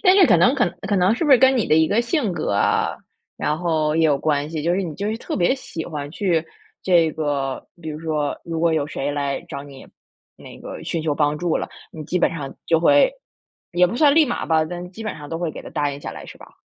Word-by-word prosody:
但 370 -1 +6
是 375 -5 +7
可 - - +5
能 255 +3 +4
可 245 -3 +2 0.2
可 200 0 +1
能 185 +4 +3
是 330 - -2
不 295 - +1
是 255 - +8
跟 265 0 +5
你 225 - +1
的 155 - +3
一 160 0 +4
个 230 +4 +2
性 240 - 0
格 165 - -2
啊， 100 - +1 0.4
然 150 - 0
后 160 -3 0
也 165 - +3
有 145 -3 +3
关 150 -1 0
系。 155 -2 -3
就 170 +2 +1
是 195 - 0
你 165 -4 -5
就 200 +5 -3
是 220 - -2
特 - - -5
别 180 +8 +2
喜 165 - -7
欢 145 -3 -5
去 175 -3 0 0.4
这 170 -4 +4
个， 140 -3 -2
比 160 - -7
如 150 0 -5
说， 155 -3 -2
如 165 -1 -4
果 165 -1 +3
有 145 -2 0
谁 145 -1 -3
来 140 -1 -2
找 140 0 -6
你， 140 -2 -12 0.5
那 - - -12
个 - - -8
寻 165 -2 -2
求 155 -2 0
帮 150 0 +1
助 175 -2 0
了， - - -4 0.2
你 155 -2 -8
基 180 - -1
本 - - +3
上 145 -5 -6
就 165 - +3
会 285 - +5 0.6
也 180 +1 +4
不 210 +7 -4
算 290 -1 +5
立 315 -2 +5
马 240 - -2
吧， 160 -1 +2
但 175 +2 -7
基 220 +4 -9
本 215 - -4
上 145 -1 -10
都 165 - -3
会 170 -2 -2
给 - - -9
他 - - -10
答 145 -1 -1
应 140 - -7
下 - - -6
来， - - -10
是 - - -11
吧？ - - -15
165 Hz, 285 characters per minute, -22 LUFS, 150-195 Hz, 0.6 s, 是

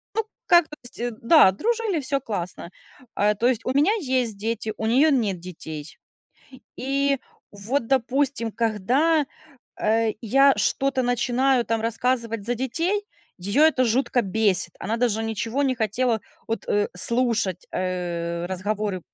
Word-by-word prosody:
ну, 445 - +1 0.2
как, 345 -2 +5
то 300 - -10
есть, 240 -1 -5
да, 230 - +7
дружили, 440 - -1
всё 275 0 -2
классно. 180 -6 -5 0.5
А, 210 +1 +3
то 235 +4 +1
есть 245 -3 +1
у 255 - 0
меня 295 +9 +4
есть 255 - -1
дети, 220 +1 -3
у 220 - -3
неё 275 +7 +4
нет 215 -9 +1
детей. 160 -3 -9 0.8
И 275 +1 +1 0.3
вот, 225 +6 -2
допустим, 260 -2 0
когда, 250 +9 +1 0.6
э, 220 +1 +2
я 275 +4 +5
что-то 270 -1 +1
начинаю 245 +1 +1
там 225 -1 -1
рассказывать 230 -1 -1
за 245 - 0
детей, 330 - -1 0.4
её 200 +11 +1
это 300 -5 +4
жутко 245 +1 +1
бесит, 195 -4 0
она 220 +4 -2
даже 230 -2 0
ничего 225 +4 -2
не 265 -2 +1
хотела 225 +1 0 0.3
вот, 225 - -3
э, 205 0 +1
слушать, 225 -3 0
э, 175 -2 -3
разговоры 200 +1 -2
230 Hz, 140 wpm, -24 LUFS, 205-270 Hz, 0.8 s, да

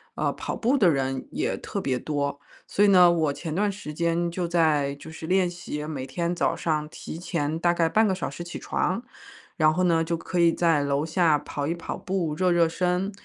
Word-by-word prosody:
呃， - - 0
跑 - - -4
步 250 +5 +1
的 185 -7 +5
人 135 -2 -1
也 355 - -1
特 200 - -5
别 130 -2 -1
多。 145 -1 -2 0.3
所 205 - +1
以 205 - +6
呢， 180 -3 +7
我 160 -4 +1
前 160 +1 -5
段 205 +5 +1
时 170 -6 -8
间 170 +1 0
就 175 0 -2
在 155 -5 +2
就 160 +3 -11
是 160 0 -8
练 185 0 +3
习 160 -4 -6
每 135 -4 -5
天 170 +6 -2
早 175 - 0
上 155 -2 -1
提 160 - -8
前 160 -3 -2
大 175 0 +3
概 165 -1 +2
半 220 +3 +3
个 190 - +1
小 190 - -3
时 160 +5 -7
起 170 - -7
床。 190 +7 -1 0.5
然 155 -1 +5
后 180 +3 0
呢， 165 -2 +3
就 170 +1 -1
可 175 +2 -3
以 170 -1 +5
在 165 -4 +2
楼 140 +1 0
下 165 -2 +3
跑 145 0 -4
一 170 - -1
跑 170 - -5
步， 185 -5 -2
热 180 +4 +1
热 170 -1 +4
身， 180 +3 0
170 Hz, 240 characters per minute, -25 LUFS, 150-180 Hz, 0.5 s, 呢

